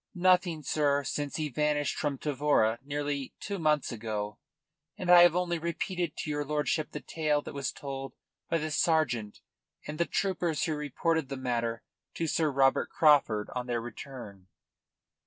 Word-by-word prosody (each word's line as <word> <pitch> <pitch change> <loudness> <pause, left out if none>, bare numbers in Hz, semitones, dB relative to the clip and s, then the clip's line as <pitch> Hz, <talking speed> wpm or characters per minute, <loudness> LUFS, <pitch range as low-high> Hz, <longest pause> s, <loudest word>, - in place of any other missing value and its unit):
"Nothing, 180 -3 +3
sir, 145 0 +1
since 145 0 -3
he 155 -1 -1
vanished 145 +1 0
from 145 -3 -1
Tavora, 140 -6 +1
nearly, 145 -1 -3
two 200 -2 -4
months 150 -4 +1
ago. 105 -2 -4 0.6
And 180 -1 0
I 175 -1 +10
have 175 -1 +6
only 175 -1 0
repeated 170 0 -3
to - - -4
your 145 0 -1
lordship 150 +1 -1
the 150 - -6
tale 150 -2 0
that - - -8
was 140 -1 -2
told 135 -1 -6 0.4
by 165 - +2
the 155 0 -3
sergeant 145 -10 +1 0.4
and 150 0 -6
the 170 - +2
troopers 180 -4 0
who 160 - 0
reported 150 +1 -1
the 135 - -4
matter 115 -3 -2 0.3
to 165 - -1
Sir 160 0 +1
Robert 135 -1 +3
Craufurd 140 -9 +3
on 125 0 -3
their 120 -1 0
return." 115 -5 -9
145 Hz, 160 wpm, -29 LUFS, 130-160 Hz, 0.6 s, I